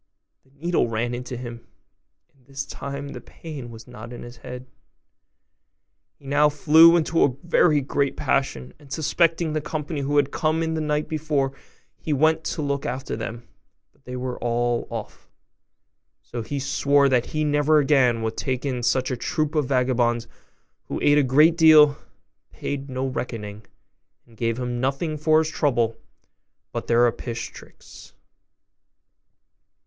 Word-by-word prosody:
the - - -29
needle 170 -4 +1
ran 115 +2 -2
into 125 0 -5
him; 120 -1 -8 0.7
and 135 -2 -30
this 135 0 -5
time 140 +1 -6
the - - -8
pain 145 -7 -9
was 115 0 -12
not 110 +3 -10
in 120 - -8
his 120 0 -11
head. 125 0 -9 1.5
He 140 - -21
now 145 +2 +3
flew 160 +3 +6
into 165 0 +2
a 130 - +2
very 165 -3 +3
great 140 +1 -1
passion, 65 - -1
and, 140 -2 -18
suspecting 165 +1 +1
the 155 - -1
company 150 0 -4
who 145 +1 0
had 145 -1 +2
come 160 +1 0
in 160 0 -1
the 160 - -2
night 150 0 -1
before, 150 -3 -1 0.5
he 155 - -2
went 160 +3 +2
to 155 - -2
look 140 -1 -1
after 130 +2 -4
them, 115 +1 -6 0.5
but - - -33
they 125 - -6
were 125 0 -4
all 120 0 0
off; - - -8 0.9
so 120 - -6
he 140 +5 -4
swore 140 +1 +2
that 125 -3 +2
he 155 0 -2
never 150 +1 +3
again 135 -6 +3
would 110 0 -2
take 130 0 -3
in 130 -3 -2
such 125 +2 +1
a - - 0
troop 155 +5 -2
of 150 -4 +1
vagabonds, 125 -3 +1 0.6
who - - -4
ate 145 0 +5
a - - +3
great 150 +6 +5
deal, 155 -3 +7 0.5
paid 140 -1 -5
no 130 0 -2
reckoning, 110 -5 -5 0.6
and 115 - -21
gave 115 0 -1
him 125 -1 -3
nothing 135 +5 -1
for 155 +1 +3
his 160 0 +2
trouble 120 -8 0 0.8
but - - -5
their 120 +1 +4
apish 120 0 -3
tricks. - - -15
140 Hz, 160 wpm, -24 LUFS, 120-150 Hz, 1.5 s, deal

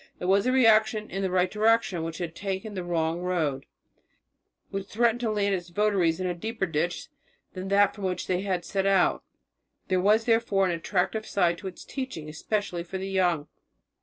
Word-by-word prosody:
It - - -4
was 195 +4 +3
a - - +3
reaction 220 -3 +4
in 195 - -3
the 190 - 0
right 180 0 +1
direction 215 -4 +2
which 165 0 -4
had 170 -2 -4
taken 195 +4 -4
the 185 -2 -4
wrong 165 -1 -1
road, 160 -7 -1 1.0
which 195 0 -4
threatened 235 +2 +1
to 235 -2 -1
land 205 -2 +1
its 175 -2 -3
votaries 185 -3 +1
in 185 - -2
a 180 - 0
deeper 220 +4 -3
ditch 165 +1 -2 0.4
than 185 0 -5
that 200 0 +4
from 200 -1 -6
which 185 -1 -2
they 180 0 0
had 185 -3 -2
set 195 -1 -1
out. 195 -2 +3 0.7
There 185 -1 +2
was 215 +4 +3
therefore 225 -4 +2
an 180 - +1
attractive 185 +5 -1
side 175 -3 +1
to 195 - -6
its 185 - -9
teaching, 260 - -5
especially 180 +2 -2
for 185 +2 -6
the 190 +1 -4
young. 175 -6 +1
190 Hz, 195 wpm, -27 LUFS, 175-210 Hz, 1.0 s, reaction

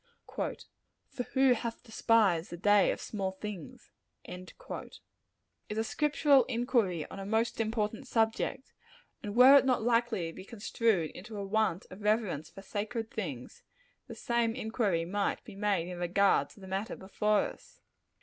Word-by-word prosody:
"For - - -3 0.8
who 265 -1 +5
hath 230 -1 -4
despised 220 -7 +2
the 175 - -7
day 205 +2 +4
of - - -1
small 195 -3 -3
things?" 190 -4 -8 0.3
is 210 - -11
a 220 - +1
scriptural 285 +1 +3
inquiry 230 - 0
on - - -7
a - - -5
most 225 +2 0
important 220 +3 -2
subject; 225 +4 0 0.5
and 205 0 -5
were 255 +3 +9
it - - -1
not 255 -4 +1
likely 230 -7 +1
to - - -16
be 185 - -9
construed 210 -4 0
into 210 +3 -9
a 200 - -3
want 205 -3 0
of 185 +3 -10
reverence 210 -8 0
for 195 - -12
sacred 220 +3 -4
things, - - -6 0.5
the - - -8
same 235 -1 0
inquiry 220 -8 0
might 200 +3 -1
be - - -11
made 200 -4 0
in 180 -1 -6
regard 190 +3 +2
to - - -17
the 190 - -11
matter 195 +3 -3
before 210 +2 +1
us. - - -8
215 Hz, 155 wpm, -31 LUFS, 190-230 Hz, 0.8 s, were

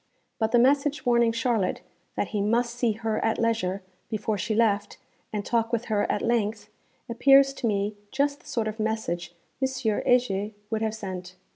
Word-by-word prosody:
But 220 -1 +1
the 240 - +5
message 280 +4 +3
warning 235 -1 +4
Charlotte 230 -4 0 0.3
'that - - -1
he 210 - -1
must 235 +3 +1
see 240 -2 +1
her 220 0 -2
at 225 - +1
leisure, 210 -5 0 0.3
before 215 -1 -1
she 215 +3 -2
left, 210 -2 +1 0.3
and 205 -2 -3
talk 230 -1 0
with 235 0 -1
her 205 - +1
at 205 - -1
length,' 220 -2 0 0.4
appears 275 +3 +5
to 250 - -2
me 205 0 0 0.2
just 285 +1 0
the - - -20
sort 235 -6 -1
of 215 +1 -5
message 215 -6 -2 0.3
M. 265 - +3
Heger 220 -3 +1 0.2
would 220 -1 -1
have 220 -1 -1
sent. 185 -3 -7
225 Hz, 175 wpm, -26 LUFS, 210-240 Hz, 0.4 s, the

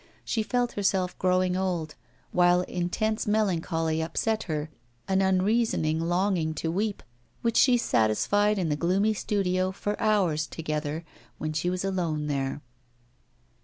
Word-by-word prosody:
She 225 - 0
felt 245 +2 0
herself 190 -2 0
growing 185 0 +2
old, 180 -5 -2 0.4
while 175 0 +4
intense 215 +6 -2
melancholy 165 -6 0
upset 215 +7 -1
her, 155 -2 -3 0.4
an 190 0 +2
unreasoning 190 -4 +2
longing 175 -1 0
to 160 - -2
weep, 205 +3 -2 0.4
which 230 -1 +1
she 250 -2 +5
satisfied 205 - +2
in 175 -4 0
the 150 - +1
gloomy 190 +7 +2
studio 185 -3 0
for 205 +2 -4
hours 180 -8 +2
together, 155 0 -4 0.3
when 155 0 -3
she 155 +3 0
was 185 +1 -2
alone 170 -6 -1
there. 140 -1 -2
180 Hz, 130 wpm, -27 LUFS, 160-205 Hz, 0.4 s, she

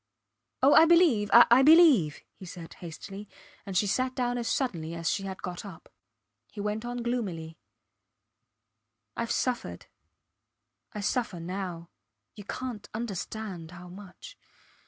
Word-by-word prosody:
Oh! 275 - +6
I 320 - +8
believe, 325 - +4
I 240 +2 +7
believe, 285 - +6
he 190 - -12
said, 170 -1 -10
hastily, 195 +4 -9 0.4
and 190 -2 -2
she 205 - +3
sat 255 +6 -1
down 245 -2 -1
as 235 - -3
suddenly 170 - -2
as 165 -1 -1
she 195 - -2
had 190 -1 -7
got 180 -1 -5
up. 195 -5 -12 0.6
He 210 - -10
went 210 +2 -3
on 240 0 -4
gloomily 180 -10 -4 1.6
Ive 235 0 -3
suffered 250 -2 -2 1.1
I 210 - -6
suffer 210 -3 -2
now. 175 -1 -6 0.4
You 205 -2 -11
cant 240 -2 -6
understand 210 -5 -5
how 180 0 -11
much. 185 0 -12
205 Hz, 135 wpm, -28 LUFS, 180-245 Hz, 1.6 s, I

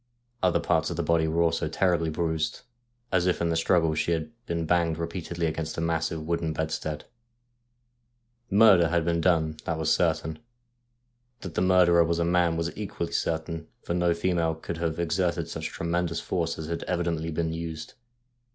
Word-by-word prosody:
Other 90 -2 +3
parts - - +1
of - - -4
the - - 0
body 85 -1 +2
were 85 +2 +2
also 80 -2 0
terribly 85 -1 +1
bruised, 80 0 -1 0.5
as 95 -1 +2
if 90 - +1
in 85 - 0
the 80 - +1
struggle 80 -1 +2
she 80 +2 0
had 80 +5 -3 0.2
been 85 -1 -1
banged 85 -1 +2
repeatedly 85 0 -3
against 80 0 -3
the - - -3
massive 80 -1 -1
wooden 85 -1 -1
bedstead. 80 -1 -3 1.4
Murder 100 -4 +6
had 85 -1 +1
been 85 -1 +1
done, 80 -3 +2
that 85 - -1
was 80 0 +2
certain. 80 -2 0 1.0
That 90 -4 -7
the - - 0
mur 90 0 +5
derer 85 0 +5
was 85 0 0
a 85 - +1
man 85 -1 +2
was 85 +1 -2
equally 90 -5 -4
certain, 80 0 -2 0.2
for - - -2
no 85 -1 +2
female 85 -2 0
could 80 +1 -6
have 85 -1 -2
exerted 85 -1 0
such 80 -1 -4
tremendous 85 0 -2
force 85 -2 -2
as 80 - -5
had 85 +1 -3
evidently 85 -2 -1
been 80 0 -1
used. 80 -1 -6
85 Hz, 180 wpm, -27 LUFS, 80-85 Hz, 1.4 s, Murder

